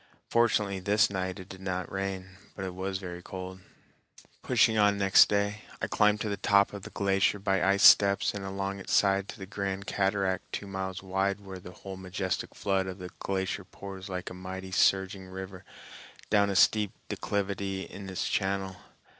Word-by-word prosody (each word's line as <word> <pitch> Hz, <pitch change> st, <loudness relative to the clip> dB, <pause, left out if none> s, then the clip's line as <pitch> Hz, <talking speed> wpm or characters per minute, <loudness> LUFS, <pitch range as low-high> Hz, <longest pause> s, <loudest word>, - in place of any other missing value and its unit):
Fortunately 105 Hz, -4 st, +2 dB
this 100 Hz, +2 st, +3 dB
night 95 Hz, -1 st, -3 dB
it 95 Hz, -, -9 dB
did 95 Hz, -1 st, -10 dB
not 95 Hz, -1 st, -3 dB
rain, 95 Hz, -1 st, -3 dB, 0.3 s
but 95 Hz, -, -5 dB
it 95 Hz, -, -5 dB
was 95 Hz, +1 st, -3 dB
very 90 Hz, -2 st, -7 dB
cold. 95 Hz, +1 st, -7 dB, 0.8 s
Pushing 115 Hz, -2 st, +3 dB
on 105 Hz, -1 st, +4 dB
next 95 Hz, -1 st, +6 dB
day, 100 Hz, +1 st, 0 dB, 0.2 s
I -, -, -1 dB
climbed 105 Hz, -1 st, +2 dB
to -, -, -1 dB
the 100 Hz, -, -2 dB
top 100 Hz, 0 st, +3 dB
of 100 Hz, -, -6 dB
the -, -, -9 dB
glacier 100 Hz, 0 st, +1 dB
by 95 Hz, -2 st, 0 dB
ice 100 Hz, +1 st, +3 dB
steps 100 Hz, -1 st, +7 dB
and 100 Hz, -1 st, -5 dB
along 95 Hz, 0 st, -3 dB
its 95 Hz, -, -5 dB
side 100 Hz, 0 st, +3 dB
to -, -, -7 dB
the 95 Hz, -, -7 dB
grand 100 Hz, 0 st, -4 dB
cataract 95 Hz, -1 st, 0 dB
two -, -, -4 dB
miles 95 Hz, -1 st, -5 dB
wide 95 Hz, +1 st, 0 dB
where 95 Hz, -2 st, -9 dB
the 90 Hz, -, -10 dB
whole 95 Hz, +1 st, -9 dB
majestic 95 Hz, 0 st, -3 dB
flood 95 Hz, -2 st, 0 dB
of 95 Hz, 0 st, -5 dB
the 90 Hz, -2 st, -8 dB
glacier 95 Hz, +1 st, -2 dB
pours 95 Hz, +1 st, -9 dB
like 90 Hz, -1 st, -4 dB
a -, -, -6 dB
mighty 95 Hz, +1 st, -7 dB
surging 95 Hz, 0 st, +2 dB
river 95 Hz, 0 st, -8 dB, 0.7 s
down 100 Hz, -1 st, +4 dB
a 100 Hz, -, -1 dB
steep 105 Hz, +1 st, +4 dB
declivity 100 Hz, -1 st, -2 dB
in 100 Hz, -1 st, -9 dB
its 95 Hz, -, -2 dB
channel. 95 Hz, -1 st, -1 dB
95 Hz, 185 wpm, -29 LUFS, 95-100 Hz, 0.8 s, steps